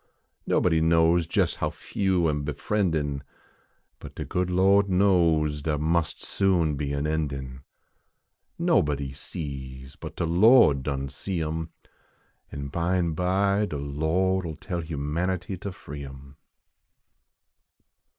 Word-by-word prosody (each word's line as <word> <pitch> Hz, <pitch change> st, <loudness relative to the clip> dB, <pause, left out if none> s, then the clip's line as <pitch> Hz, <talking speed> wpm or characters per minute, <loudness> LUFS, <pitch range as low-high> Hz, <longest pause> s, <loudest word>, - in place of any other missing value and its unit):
Nobody 80 Hz, -3 st, +2 dB
knows 80 Hz, +1 st, +3 dB
jes -, -, +1 dB
how -, -, -1 dB
few 95 Hz, -4 st, 0 dB
am 75 Hz, -2 st, -1 dB
befriendin. 75 Hz, -2 st, -1 dB, 0.8 s
But -, -, -11 dB
de -, -, -5 dB
good 90 Hz, 0 st, -1 dB
Lo 95 Hz, +2 st, +5 dB
d 100 Hz, -1 st, -6 dB
knows 85 Hz, -6 st, +3 dB
dar 75 Hz, 0 st, -1 dB
must 80 Hz, 0 st, 0 dB
soon 90 Hz, -6 st, +1 dB
be 70 Hz, 0 st, -3 dB
an 70 Hz, +1 st, -1 dB
endin 70 Hz, -4 st, -3 dB, 1.0 s
Nobody 70 Hz, -2 st, +1 dB
sees 65 Hz, -3 st, -7 dB
but -, -, -9 dB
de -, -, -1 dB
Lo 95 Hz, -, +6 dB
d 70 Hz, -, -5 dB
done 70 Hz, 0 st, -3 dB
see 85 Hz, +5 st, -3 dB
em, 80 Hz, +1 st, -3 dB, 0.8 s
An 70 Hz, -1 st, -5 dB
bime 85 Hz, +1 st, 0 dB
bv 100 Hz, +4 st, +1 dB
de 75 Hz, -, -3 dB
Lo 80 Hz, +7 st, 0 dB
d 90 Hz, -, -6 dB
11 80 Hz, -2 st, -6 dB
tell 85 Hz, 0 st, -4 dB
humanitv 85 Hz, +5 st, -3 dB
ter 100 Hz, -, -4 dB
free 75 Hz, -4 st, -9 dB
em. 70 Hz, +1 st, -12 dB
80 Hz, 130 wpm, -26 LUFS, 70-90 Hz, 1.0 s, Lo